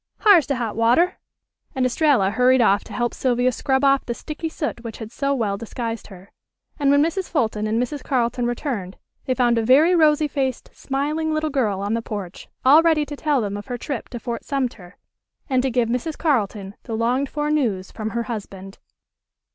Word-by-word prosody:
H'ar's 390 - +6
de 275 - 0
hot 235 -3 -3
water," 245 - +3 0.6
and 260 -1 +1
Estralla 255 -6 +2
hurried 255 +3 +4
off 205 -3 +3
to - - -13
help 240 -1 -1
Sylvia 250 0 +1
scrub 265 +2 0
off 275 0 +4
the 235 - -4
sticky 310 +4 -5
soot 295 -6 -4
which 230 -2 -7
had 220 -1 -8
so 275 +2 -1
well 210 -6 -1
disguised 230 0 -5
her; 190 -1 -14 0.5
and 280 -1 +2
when 285 +1 +5
Mrs. 345 +4 -2
Fulton 220 -8 0
and 220 +2 0
Mrs. 255 +3 -3
Carleton 245 -1 0
returned 240 -7 -4 0.3
they 255 - 0
found 240 -2 +2
a - - 0
very 285 +9 +5
rosy 305 -2 +4
faced 265 -3 -3
smiling 300 +4 -2
little 310 0 -1
girl 215 -8 0
on 205 +2 -1
the 230 - 0
porch 200 -5 -7 0.2
all 290 +5 +8
ready 320 -3 +2
to 290 +1 -7
tell 290 -3 +1
them 205 -2 -3
of 205 +3 -7
her 245 -2 -4
trip 265 +1 -5
to 240 - -6
Fort 235 -1 -5
Sumter, 240 -10 -4 0.5
and 260 -3 +2
to 265 - 0
give 240 -1 +1
Mrs. 250 +7 -2
Carleton 210 - -1
the 225 - -5
longed 250 +4 0
for 295 0 -2
news 220 -11 0
from 215 -1 -4
her 235 +2 -2
husband. 195 -4 -7
250 Hz, 200 wpm, -22 LUFS, 225-285 Hz, 0.6 s, all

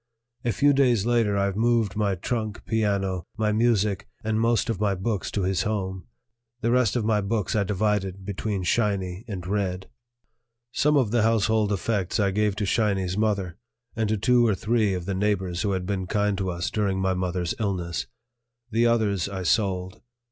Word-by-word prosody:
A 120 - +1
few 145 +7 +3
days 125 -7 +3
later 115 -4 +2
I 100 0 +1
moved 115 -1 +1
my 105 -2 +1
trunk, 110 +3 -3
piano, 100 -5 0
my 110 -1 +1
music, 105 -3 +1 0.2
and 110 0 0
most 115 -2 +2
of 115 -5 -2
my 100 -2 +1
books 100 +2 -2
to 100 - -2
his 95 0 +1
home; 95 -3 -3 0.5
the 115 - +1
rest 125 -4 +3
of 120 -3 0
my 105 -2 +2
books 105 +1 -1
I 105 - +3
divided 100 -1 -1
between 100 0 -3
"Shiny" 95 -1 0
and 95 -5 -5
"Red." 95 -1 -2 0.8
Some 150 +3 +2
of 125 -7 +2
the 120 -1 +3
household 110 -1 +2
effects 100 0 -1
I 100 -2 +2
gave 105 0 +1
to 105 - -2
"Shiny's" 95 -3 0
mother 100 -4 -1 0.4
and 110 -2 0
to 110 - +1
two 120 +3 +4
or 105 - +2
three 110 0 +1
of 90 -1 -5
the 100 - -2
neighbors 95 -3 0
who 100 0 0
had 95 -1 -2
been 95 -1 -2
kind 105 0 +1
to 95 -1 -1
us 90 +3 -3
during 100 -3 0
my 95 0 +1
mother's 90 -1 -1
illness; 85 - -2 0.6
the 115 +2 +3
others 105 -6 +1
I 95 -1 -4
sold. 95 -1 0
100 Hz, 185 wpm, -25 LUFS, 95-110 Hz, 0.8 s, two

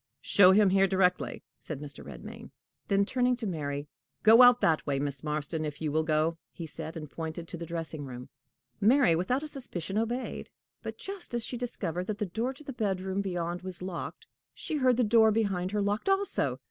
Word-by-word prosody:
"Show 190 -2 +6
him 200 0 +5
here 195 0 +4
directly," 185 -1 +1 0.2
said 155 -4 -6
Mr. 145 -1 -5
Redmain. 65 -4 -10 0.4
Then 200 0 +3
turning 250 +2 +1
to 240 -2 -5
Mary, 145 -5 -3 0.4
"Go 225 +3 +8
out 245 0 +8
that 160 -2 +3
way, 140 -1 +1
Miss 140 -1 -3
Marston, 150 +1 -2
if 150 -2 -4
you 155 -2 -2
will 155 +2 +2
go," 155 +1 +1
he 170 - -7
said, 160 +1 -7
and 155 -1 -6
pointed 160 +2 -6
to - - -5
the 170 0 -7
dressing 165 -2 -5
room. 125 -1 -8 0.5
Mary, 235 - +5
without 245 - 0
a - - -4
suspicion, 210 - -3
obeyed; 240 +3 -3 0.3
but, - - -6
just 385 -10 -5
as 235 - 0
she - - -4
discovered 185 -8 -3
that 215 - -2
the 210 - -1
door 225 +7 -2
into 270 +3 -8
the 275 - -6
bedroom 190 -4 -1
beyond 175 -2 -3
was 180 -1 -5
locked, 185 -2 -6 0.3
she 310 - -3
heard 255 -3 +3
the 250 - +3
door 220 0 +5
behind 195 -5 0
her 205 0 0
locked 205 - -1
also. 390 +1 +1
185 Hz, 200 wpm, -29 LUFS, 160-230 Hz, 0.5 s, Go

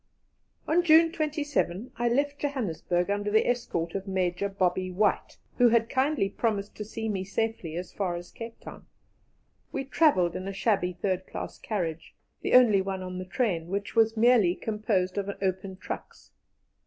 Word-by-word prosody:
On 340 +3 +4
June 330 -1 +6
27 290 - -1
I 240 0 +1
left 285 +4 0
Johannesburg 200 - -1
under 205 0 -1
the 220 +1 +3
escort 170 -9 -1
of 195 0 -4
Major 190 +1 0
Bobby 185 -1 0
White, 205 +3 0 0.2
who 245 -1 +7
had 230 0 +2
kindly 265 -5 +2
promised 205 0 -2
to 210 - -4
see 225 +1 -5
me 195 -3 -1
safely 200 -4 -2
as 180 +1 -5
far 185 -4 -1
as 175 0 -8
Cape 230 0 -9
Town. - - -11 0.8
We 270 - -3
travelled 265 - +3
in 185 - -4
a 195 - -4
shabby 195 -3 +1
third 185 +1 -2
class - - -6
carriage, 170 -7 -4 0.3
the - - -1
only 225 -6 +6
one 190 -1 -4
on 185 0 -5
the 185 - -5
train, 185 -5 -1
which 200 +4 -4
was 225 0 +3
merely 220 -6 +5
composed 210 -4 -1
of 200 0 -4
open 190 0 -2
trucks. 185 - -8
200 Hz, 165 wpm, -28 LUFS, 185-235 Hz, 0.8 s, who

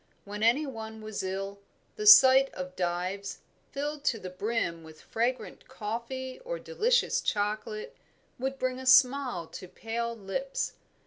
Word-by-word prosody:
When 205 +1 -7
any 240 +7 +3
one 220 -4 -7
was 215 -1 -4
ill, 195 +1 -4 0.4
the 425 0 -3
sight 270 -8 +9
of 185 0 -6
Dives, 185 +3 -3 0.3
filled 290 +1 -4
to 230 - +2
the 185 -4 -8
brim 185 -4 -2
with 160 -1 -13
fragrant 240 +3 -3
coffee 255 +2 -5
or - - -4
delicious 485 0 +1
chocolate, 215 - -2 0.4
would 265 +1 -2
bring 255 -1 -2
a 260 - -7
smile 255 -7 +4
to 185 - -10
pale 235 +4 -4
lips. 245 +7 -3
235 Hz, 140 wpm, -29 LUFS, 200-270 Hz, 0.4 s, sight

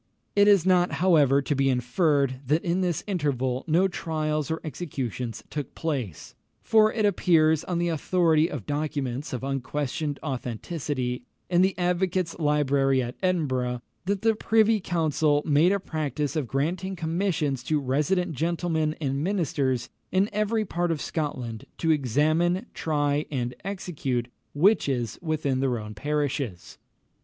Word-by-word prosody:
It 205 0 +5
is 200 -4 +5
not, 180 -1 +3
however, 145 -7 +4
to 145 - 0
be 135 -1 +2
inferred, 135 +1 +1
that 155 +4 +2
in 175 +2 0
this 175 -3 -1
interval 135 - -1
no 170 +5 +4
trials 155 -4 -2
or 160 0 -1
executions 130 - -4
took 145 -4 -5
place; 130 - -4 0.3
for 215 -1 +5
it 215 -2 0
appears, 160 -5 +3
on 180 - -2
the 175 0 +1
authority 165 0 +2
of 130 -9 -6
documents 145 -2 -3
of 130 -1 -4
unquestioned 140 +2 -2
authenticity 130 0 -3 0.3
in 175 0 +4
the 190 -1 +2
Advocates' 180 -1 0
Library 140 -3 +2
at 120 0 -5
Edinburgh, 130 -9 0 0.2
that 200 +1 -1
the 225 0 +4
Privy 220 0 +3
Council 155 -4 +1
made 155 +4 +4
a 200 - +1
practice 150 -4 -3
of 150 -5 -1
granting 175 +9 -1
commissions 160 -5 -1
to 155 +3 +1
resident 150 +7 0
gentlemen 160 0 0
and 140 -1 -1
ministers 140 - 0 0.2
in 190 +3 +2
every 215 +1 0
part 175 -2 -1
of 160 - -1
Scotland 125 -10 -4
to 165 - +1
examine, 155 - +2
try, 145 -1 0
and 125 -4 -2
execute 155 -11 -3 0.3
witches 140 - +2
within 155 -5 -1
their 130 -2 +1
own 105 -1 -7
parishes. 140 - -3
155 Hz, 140 wpm, -26 LUFS, 135-175 Hz, 0.3 s, It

